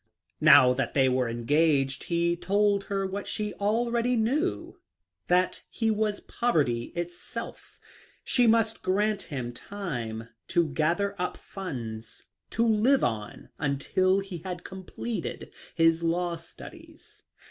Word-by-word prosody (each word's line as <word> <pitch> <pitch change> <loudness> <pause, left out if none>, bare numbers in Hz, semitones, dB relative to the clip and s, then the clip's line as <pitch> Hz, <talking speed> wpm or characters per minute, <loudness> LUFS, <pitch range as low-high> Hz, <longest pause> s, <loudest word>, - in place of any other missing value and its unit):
Now 125 0 +8
that 135 +1 -2
they 135 -2 +5
were 130 -1 +1
engaged 135 +3 +1
he 170 0 +1
told 200 +2 +1
her 195 -1 -1
what 195 +1 -4
she 210 -1 -3
already 235 +4 +1
knew, 265 +11 -1 0.5
that 180 +1 +2
he 225 -1 0
was 210 -1 -1
poverty 140 - 0
itself. 175 0 -6 0.5
She 245 -2 +3
must 225 0 +2
grant 205 +2 +1
him 125 -6 -5
time 120 - -5 0.2
to 170 -2 +2
gather 170 +8 0
up 180 - -2
funds 120 - -7 0.3
to 230 - +1
live 230 +5 +3
on 110 -2 -3
until 185 +7 +1
he 195 -3 -7
had 180 +1 -6
completed 190 +4 -6 0.2
his 165 0 +4
law 170 +1 0
studies. 330 - -13
185 Hz, 125 wpm, -27 LUFS, 145-215 Hz, 0.5 s, Now